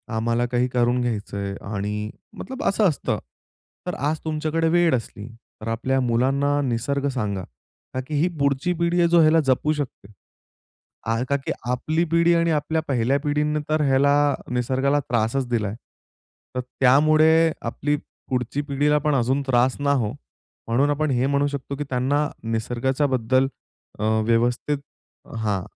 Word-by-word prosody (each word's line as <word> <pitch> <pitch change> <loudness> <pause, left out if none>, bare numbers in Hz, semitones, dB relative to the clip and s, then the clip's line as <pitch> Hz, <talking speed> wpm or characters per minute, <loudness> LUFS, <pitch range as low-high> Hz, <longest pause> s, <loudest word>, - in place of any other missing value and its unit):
आम्हाला 115 +2 +1
काही 125 +1 +1
करून 120 0 +2
घ्यायचंय 100 -4 -3 0.2
आणि 105 +1 -3 0.3
मतलब 265 +2 -6
असं 205 +1 +3
असतं. 150 - -2 0.7
तर - - -2
आज 150 +4 -1
तुमच्याकडे 155 +1 0
वेळ 170 -3 +4
असली, 110 -3 -6 0.3
तर 110 - -7
आपल्या 130 +4 0
मुलांना 135 +4 +1
निसर्ग 140 +2 -1
सांगा, 105 -8 -2 0.5
ता 130 - -2
की 155 - -3
ही 170 - +3
पुढची 140 +5 +1
पिढी 170 +1 +1
आहे, 170 - +4
ह्याला 160 +1 +5
जपू 135 +3 +2
शकते. 135 -8 -6 1.2
का 140 - +2
की - - -1 0.2
आपली 155 +7 0
पिढी 170 +1 +4
आणि 170 0 +2
आपल्या 155 +1 0
पहिल्या 130 +1 +1
पिढीने 150 0 0
तर 155 0 +2
ह्याला 140 +1 +4 0.4
निसर्गाला 130 +3 +1
त्रासच 120 +3 0
दिलाय. 105 -4 -1 0.8
तर - - 0
त्यामुळे 155 +6 +4 0.2
आपली 145 +5 -1 0.3
पुढची 125 +2 -1
पिढीला 145 +1 +1
पण 150 -1 +1
अजून 130 +2 +1
त्रास 125 0 +2
ना 140 0 +1
हो, 115 -6 0 0.6
म्हणून 130 +5 +2
आपण 145 0 0
हे 125 0 +1
म्हणू 140 +1 +2
शकतो 140 -1 -5
की 145 - -2
त्यांना 135 +4 +1 0.2
निसर्गाच्याबद्दल 130 +2 +1 0.5
अ, 105 - -2 0.2
व्यवस्थित 120 +5 +1 0.6
हां. 105 -4 -1
135 Hz, 140 wpm, -23 LUFS, 120-150 Hz, 1.2 s, ह्याला